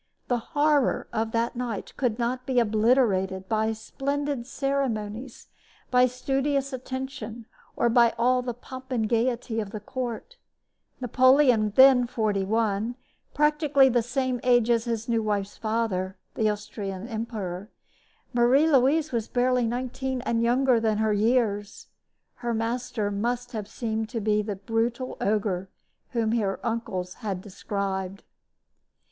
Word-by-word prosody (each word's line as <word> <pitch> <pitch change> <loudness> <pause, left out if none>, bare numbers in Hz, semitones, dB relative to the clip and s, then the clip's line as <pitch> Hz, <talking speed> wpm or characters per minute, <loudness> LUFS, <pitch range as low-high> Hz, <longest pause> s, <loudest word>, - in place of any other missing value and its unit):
The 245 -1 +2 0.2
horror 290 -2 +3
of 220 0 -1
that 230 +1 0
night 240 -4 -4
could 245 -5 0
not 250 +2 -2
be 255 -2 +3
obliterated 210 -4 +2
by 220 +1 +1
splendid 275 +3 -3
ceremonies, 260 -4 -3 0.4
by 250 0 +5
studious 270 +2 -1
attention, 260 -3 -6 0.3
or - - +2
by 235 0 +4
all 250 +2 +3
the 245 -2 -4
pomp 260 +1 -10
and 225 -4 +1
gaiety 235 0 0
of 210 -3 -3
the 215 +1 -6
court. 250 - -5 0.6
Napoleon 255 -1 +4
was 210 - -3
then 260 -2 +7
forty 215 -4 0
one 220 +2 0 0.4
practically 300 -2 +4
the 240 -1 +2
same 255 +1 -1
age 240 -2 +3
as 230 0 +2
his 230 -1 -2
new 230 -1 +1
wife's 205 -2 -2
father, 215 -4 -1 0.2
the 215 -1 +1
Austrian 205 -1 -5
emperor; 215 -4 -5 0.6
Marie 245 +6 +4
Louise 290 +4 +3
was 230 -3 -1
barely 250 -1 +1
nineteen 255 +2 -3
and 230 -1 0
younger 245 +1 +3
than 220 -2 +1
her 220 0 +2
years. 210 -2 0 0.5
Her 240 -1 -2
master 225 -2 -2
must 240 +4 -2
have 215 -4 -5
seemed 220 -1 -3
to 235 -1 -3
be 210 0 +1
the 205 -1 -4
brutal 230 +5 -2
ogre 195 -3 0 0.4
whom 230 -3 0
her 205 -4 0
uncles 190 -6 -3
had 200 -5 -3
described. 195 0 -4
235 Hz, 140 wpm, -26 LUFS, 215-255 Hz, 0.6 s, then